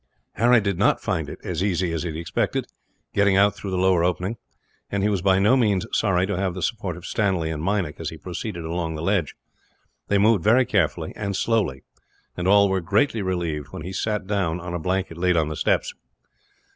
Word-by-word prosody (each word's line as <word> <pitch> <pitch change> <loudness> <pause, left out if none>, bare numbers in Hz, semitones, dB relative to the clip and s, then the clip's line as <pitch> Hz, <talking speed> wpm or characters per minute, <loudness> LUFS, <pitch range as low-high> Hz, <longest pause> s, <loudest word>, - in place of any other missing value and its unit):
Harry 120 +1 +4
did 100 -4 -2
not - - +3
find - - -2
it - - -7
as - - -2
easy 90 -3 0
as 80 - -2
he 90 - -3
had 80 - -6
expected, 85 0 -1 0.5
getting 100 -1 +3
out 100 +1 +5
through 100 - -6
the 95 - -1
lower 90 -2 +3
opening; 90 +5 -1 0.5
and 100 -1 -1
he 105 - +3
was 100 -4 0
by 95 0 +3
no 105 +6 +4
means 105 -7 +2
sorry 95 -4 +2
to 100 - -2
have 95 -1 -1
the 90 - -4
support 95 -3 -2
of 90 - -11
Stanley 95 -7 0
and 75 -1 -4
Meinik, 95 -4 -1
as - - -3
he - - -9
proceeded 90 -1 -6
along 80 -1 -3
the 80 - -5
ledge. 95 -5 0 0.7
They 100 - +2
moved 105 -3 +3
very 120 +4 +5
carefully, 95 -9 0
and 100 -2 -3
slowly; 100 - 0 0.5
and 90 +1 -2
all 100 +1 +6
were 95 -1 0
greatly 105 +6 +1
relieved 85 -6 -2
when 75 - -8
he 95 +3 -6
sat 105 -1 -2
down, 95 -4 -1
on 90 0 -6
a 85 - -2
blanket 90 0 -2
laid 90 -1 +2
on 80 -2 +1
the 75 - -4
steps. - - 0
95 Hz, 215 wpm, -23 LUFS, 85-100 Hz, 0.7 s, all